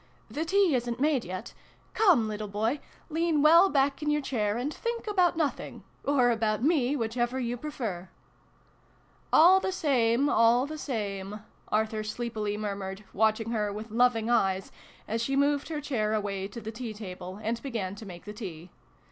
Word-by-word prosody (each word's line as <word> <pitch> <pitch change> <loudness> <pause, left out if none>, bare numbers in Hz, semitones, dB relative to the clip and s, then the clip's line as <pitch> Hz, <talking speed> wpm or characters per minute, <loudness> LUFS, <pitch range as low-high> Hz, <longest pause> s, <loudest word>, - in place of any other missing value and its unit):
" - - -25
The 320 - 0
tea 385 -1 +3
isn't 240 -1 -1
made 285 -3 +2
yet. 185 +1 -6 0.4
Come, 345 - +4
little 215 0 -4
boy, 220 +7 -1 0.3
lean 320 -2 +1
well 335 +5 +7
back 275 -1 +1
in 300 - -1
your 300 0 +2
chair, 215 -5 -1
and 270 +5 -2
think 470 0 -4
about 365 -5 +2
nothing 310 -4 -2 0.2
or 255 -4 +3
about 220 -1 0
me, 285 -3 +2
whichever 240 +1 -1
you 240 -1 -2
prefer! 230 -10 -5 0.4
" - - -35
" - - -34
All 360 +4 +7
the 380 - -2
same, 265 -6 +2
all 235 0 +4
the 310 +1 -7
same! 205 -5 -4
" - - -28
Arthur 220 0 0
sleepi 215 -1 -3
ly - - -4
murmured, 200 -1 -4
watching 220 +2 +1
her 210 -3 0
with 215 +2 -7
loving 230 -1 +2
eyes, 195 -5 +1 0.4
as 225 +2 -1
she 270 +3 -1
moved 285 0 +2
her 310 -2 -3
chair 220 -7 -1
away 200 -2 -2
to 205 +4 -8
the 220 0 -6
tea 225 -1 -6
table, 185 -2 -8
and 225 +2 -2
began 225 -9 -3
to 205 +2 -10
make 175 -2 -10
the 210 - -7
tea. 180 -6 -8
230 Hz, 185 wpm, -28 LUFS, 210-285 Hz, 0.4 s, well